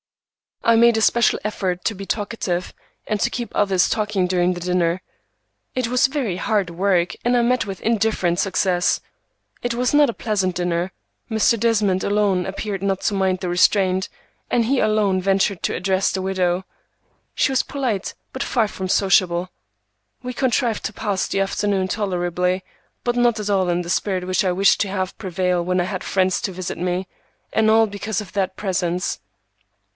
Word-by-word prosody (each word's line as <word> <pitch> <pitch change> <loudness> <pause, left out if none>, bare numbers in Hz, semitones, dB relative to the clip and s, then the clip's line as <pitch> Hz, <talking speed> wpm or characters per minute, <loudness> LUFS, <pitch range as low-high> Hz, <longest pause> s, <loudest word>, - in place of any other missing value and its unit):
I 230 - +5
made 235 0 +5
a - - +1
special 235 +1 +3
effort 185 -4 -2
to 220 - 0
be 195 +1 -7
talkative, 205 -4 -2 0.3
and 215 -1 -1
to 240 - +1
keep 240 -1 -5
others 190 -3 +2
talking 210 -3 0
during 180 0 +1
the 175 - -6
dinner. 180 0 0 0.7
It 255 -2 0
was 250 +1 +3
very 265 -10 -2
hard 200 -1 0
work, 180 0 +1
and 245 +1 +3
I 240 - +4
met 250 +1 +2
with 195 -2 -6
indifferent 215 -6 +1
success. 185 -2 +1 0.6
It 245 -1 -1
was 250 +3 0
not 290 -2 +5
a - - -2
pleasant 195 -6 -1
dinner. 175 +1 -1 0.4
Mr. 220 +1 +2
Desmond 210 -5 +2
alone 200 -3 +1
appeared 195 0 -4
not 195 -1 -1
to - - 0
mind 190 -2 +1
the 180 - -3
restraint, 185 +1 +2 0.4
and 235 -1 +2
he 265 +3 +1
alone 210 -3 +2
ventured 195 0 +1
to - - 0
address 190 +1 +1
the 190 - -2
widow. 185 -1 0 0.7
She - - +2
was 265 - +2
polite, 250 -9 -2 0.2
but 260 - -2
far 230 -6 +1
from 190 -2 -5
sociable. 185 -2 +2 0.7
We 250 0 -4
contrived 245 -3 0
to 220 - -3
pass 205 -2 -1
the 195 - 0
afternoon 195 -1 0
tolerably, 180 -2 -1 0.4
but 240 0 0
not 240 -2 +2
at 210 -1 -3
all 190 -2 +2
in 175 0 +1
the 170 - -7
spirit 185 0 0
which 185 +2 +1
I 185 - +2
wished 195 +2 +3
to 205 - +1
have 190 -1 -3
prevail 180 -3 0
when 180 +1 0
I - - +2
had 185 -1 -4
friends 185 -1 +1
to 195 - -2
visit 185 -1 -5
me, 180 +1 -2 0.5
and 220 0 +3
all 225 +1 +5
because 205 0 -3
of 195 -3 -11
that 190 -2 -1
presence. 180 - -1
195 Hz, 180 wpm, -21 LUFS, 180-220 Hz, 0.7 s, I